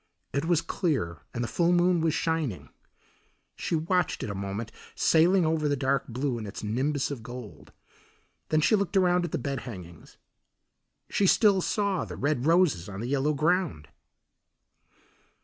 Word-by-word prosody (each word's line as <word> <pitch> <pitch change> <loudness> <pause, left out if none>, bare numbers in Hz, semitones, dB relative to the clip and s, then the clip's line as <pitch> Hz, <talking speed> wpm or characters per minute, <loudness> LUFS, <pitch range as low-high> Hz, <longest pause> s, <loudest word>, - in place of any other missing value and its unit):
It 140 +3 0
was 170 -1 +2
clear 130 - -1
and 120 - -3
the - - -2
full 170 +5 +1
moon 175 -1 +3
was 160 -1 +1
shining. 140 - -2 0.9
She - - -2
watched 170 +2 0
it 105 - -3
a - - -4
moment 100 +3 -4 0.2
sailing 170 +2 +4
over 155 -1 +1
the 145 - +1
dark 135 0 0
blue 125 0 -2
in 110 - -6
its 100 - -7
nimbus 135 +7 -1
of 135 -5 -5
gold. 120 -2 -10 0.8
Then 155 0 +2
she 215 - +4
looked 200 -1 0
around 180 -1 +3
at 170 - -6
the - - -1
bed 140 -1 -3
hangings. 90 -8 -10 0.9
She 200 - +2
still 200 -1 +4
saw 200 -1 0
the - - -7
red 145 -1 0
roses 165 - +3
on 95 -1 -7
the 120 +3 -4
yellow 140 +2 +1
ground. 155 - 0
145 Hz, 165 wpm, -27 LUFS, 120-175 Hz, 0.9 s, sailing